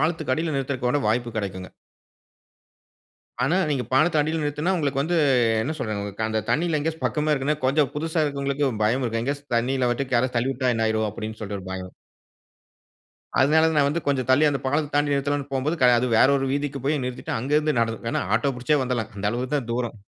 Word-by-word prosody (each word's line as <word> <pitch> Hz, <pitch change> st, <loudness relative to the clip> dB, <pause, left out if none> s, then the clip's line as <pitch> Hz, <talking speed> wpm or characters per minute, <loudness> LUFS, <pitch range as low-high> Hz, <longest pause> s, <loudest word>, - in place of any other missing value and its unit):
பாலத்துக்கு 155 Hz, -3 st, 0 dB
அடில 160 Hz, -1 st, -2 dB
நிறுத்துறதுக்கான 135 Hz, 0 st, -1 dB
வாய்ப்பு 120 Hz, +2 st, 0 dB
கெடைக்குங்க. 95 Hz, -3 st, -4 dB, 1.8 s
ஆனா, 160 Hz, +7 st, +2 dB
நீங்க 135 Hz, -4 st, 0 dB
பாலத்துக்கு 155 Hz, +4 st, +3 dB
அடில 155 Hz, +2 st, 0 dB
நிறுத்துனா 150 Hz, +5 st, -1 dB
உங்களுக்கு 140 Hz, -5 st, 0 dB
வந்து, 170 Hz, +5 st, 0 dB, 0.5 s
என்ன 155 Hz, +7 st, -2 dB
சொல்றதுங்க, 105 Hz, -4 st, -4 dB
அந்த 110 Hz, 0 st, -1 dB
தண்ணில 165 Hz, 0 st, +1 dB
எங்கயாச்சு 160 Hz, +2 st, -3 dB
பக்கமா 150 Hz, 0 st, 0 dB
இருக்குதுன்னா 145 Hz, +1 st, 0 dB
கொஞ்சம் 140 Hz, 0 st, +2 dB
புதுசா 160 Hz, +1 st, -1 dB
இருக்குறவங்களுக்கு 140 Hz, -1 st, -1 dB
பயம் 125 Hz, +5 st, +1 dB
இருக்கும், 115 Hz, -1 st, -1 dB
எங்கயாச்சு 140 Hz, +2 st, -3 dB
தண்ணில 125 Hz, +1 st, 0 dB
விட்டு 130 Hz, +1 st, -1 dB
யாராச்சு 120 Hz, 0 st, +1 dB
தள்ளி 130 Hz, +3 st, +1 dB
விட்டா 130 Hz, -1 st, 0 dB
என்ன 115 Hz, 0 st, +1 dB
ஆயிரும் 110 Hz, 0 st, 0 dB
அப்பிடின்னு 110 Hz, 0 st, -7 dB
சொல்லிட்டு 100 Hz, -1 st, -4 dB
ஒரு 95 Hz, -, -9 dB
பயம். 95 Hz, -1 st, -6 dB, 1.5 s
அதனால, 160 Hz, +4 st, +4 dB
நான் 145 Hz, -2 st, +4 dB
வந்து 165 Hz, +3 st, -2 dB
கொஞ்சம் 135 Hz, -3 st, 0 dB
தள்ளி, 145 Hz, +4 st, +5 dB
அந்த 140 Hz, -2 st, -2 dB
பாலத்த 145 Hz, +2 st, 0 dB
தாண்டி 145 Hz, 0 st, +2 dB
நிறுத்தலாம்னு 140 Hz, 0 st, -1 dB
போம்போது, 140 Hz, +5 st, 0 dB
கடை 125 Hz, -1 st, +6 dB
அது 125 Hz, -, 0 dB
வேற -, -, +6 dB
ஒரு 135 Hz, -, -1 dB
வீதிக்கு 140 Hz, -1 st, -2 dB
போய் 145 Hz, -1 st, +1 dB
நிறுத்திட்டு, 125 Hz, 0 st, -5 dB
அங்க 130 Hz, +5 st, -5 dB
இருந்து 155 Hz, -3 st, 0 dB
நடந்து, 115 Hz, -1 st, 0 dB
இல்லன்னா 115 Hz, -, -1 dB
ஆட்டோ 135 Hz, +4 st, 0 dB
புடிச்சே 140 Hz, +4 st, +1 dB
வந்துடலாம். 120 Hz, -3 st, -2 dB
அந்த 100 Hz, 0 st, -5 dB
அளவுக்கு 125 Hz, +4 st, -3 dB
தான் 120 Hz, -5 st, -2 dB
தூரம். 120 Hz, -2 st, -2 dB
135 Hz, 190 wpm, -24 LUFS, 120-150 Hz, 1.8 s, கடை